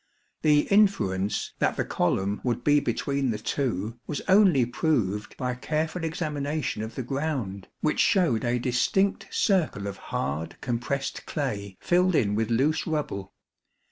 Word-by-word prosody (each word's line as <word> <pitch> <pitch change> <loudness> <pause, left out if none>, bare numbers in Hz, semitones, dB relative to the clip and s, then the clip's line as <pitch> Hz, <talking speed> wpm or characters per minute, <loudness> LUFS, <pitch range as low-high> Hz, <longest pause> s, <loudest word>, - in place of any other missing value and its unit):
The 150 -1 +5
inference 105 - +2
that - - +1
the - - 0
column 95 +3 0
would 120 -1 -1
be 145 +1 +5
between 140 -2 -1
the 110 - -1
two 115 -2 -2
was 150 - -3
only 190 - +5
proved 115 - -1
by 125 -2 -1
careful 155 +6 -2
examination 150 -6 -2
of 110 +1 -6
the 130 - -3
ground, 130 - -3
which 155 - +1
showed 165 - +3
a 120 0 +1
distinct 130 +11 +1
circle 175 - +1
of 100 -1 -5
hard 70 +5 -3
compressed 125 +3 -3
clay 100 - -3
filled 180 0 +2
in 105 -8 +2
with 110 +1 0
loose 135 +7 +1
rubble. 145 -11 -3
130 Hz, 140 wpm, -26 LUFS, 105-155 Hz, -, The